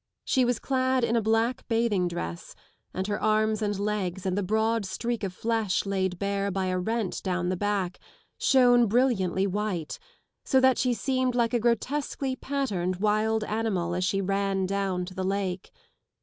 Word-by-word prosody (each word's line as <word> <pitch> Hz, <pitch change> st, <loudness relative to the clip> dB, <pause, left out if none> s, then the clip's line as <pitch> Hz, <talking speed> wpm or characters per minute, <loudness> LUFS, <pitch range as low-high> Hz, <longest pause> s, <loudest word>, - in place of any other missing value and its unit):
She 260 Hz, -2 st, +3 dB
was 245 Hz, -1 st, +1 dB
clad 260 Hz, 0 st, 0 dB
in 235 Hz, 0 st, +1 dB
a 230 Hz, -, +3 dB
black 225 Hz, +3 st, 0 dB
bathing 225 Hz, -6 st, +1 dB
dress, 85 Hz, -, -5 dB, 0.4 s
and 190 Hz, -, -3 dB
her 205 Hz, 0 st, -2 dB
arms 215 Hz, 0 st, +2 dB
and 205 Hz, -2 st, -1 dB
legs 200 Hz, -3 st, -2 dB
and 185 Hz, -1 st, 0 dB
the 205 Hz, -, 0 dB
broad 220 Hz, +3 st, +1 dB
streak 230 Hz, +4 st, -3 dB
of 195 Hz, -, -1 dB
flesh 220 Hz, 0 st, -1 dB
laid 190 Hz, -2 st, -1 dB
bare 200 Hz, +1 st, -1 dB
by 190 Hz, 0 st, -1 dB
a 185 Hz, 0 st, 0 dB
rent 220 Hz, +1 st, -2 dB
down 180 Hz, -2 st, -1 dB
the 185 Hz, -, 0 dB
back 195 Hz, -2 st, -1 dB, 0.4 s
shone 245 Hz, -3 st, +5 dB
brilliantly 200 Hz, -5 st, +2 dB
white, 195 Hz, -5 st, -3 dB, 0.4 s
so 265 Hz, -, +3 dB
that 260 Hz, -1 st, +4 dB
she 250 Hz, -2 st, +2 dB
seemed 255 Hz, 0 st, 0 dB
107 -, -, 0 dB
like 235 Hz, -1 st, +1 dB
a 240 Hz, -, +2 dB
grotesquely 260 Hz, +3 st, -1 dB
patterned 210 Hz, -11 st, -2 dB
wild 215 Hz, +2 st, +1 dB
animal 210 Hz, -6 st, -1 dB
as 180 Hz, +1 st, -1 dB
she 195 Hz, +2 st, +1 dB
ran 195 Hz, 0 st, 0 dB
down 190 Hz, -2 st, -1 dB
to 185 Hz, -, -9 dB
the 185 Hz, 0 st, -3 dB
lake. 190 Hz, -1 st, -2 dB
210 Hz, 175 wpm, -27 LUFS, 190-235 Hz, 0.4 s, shone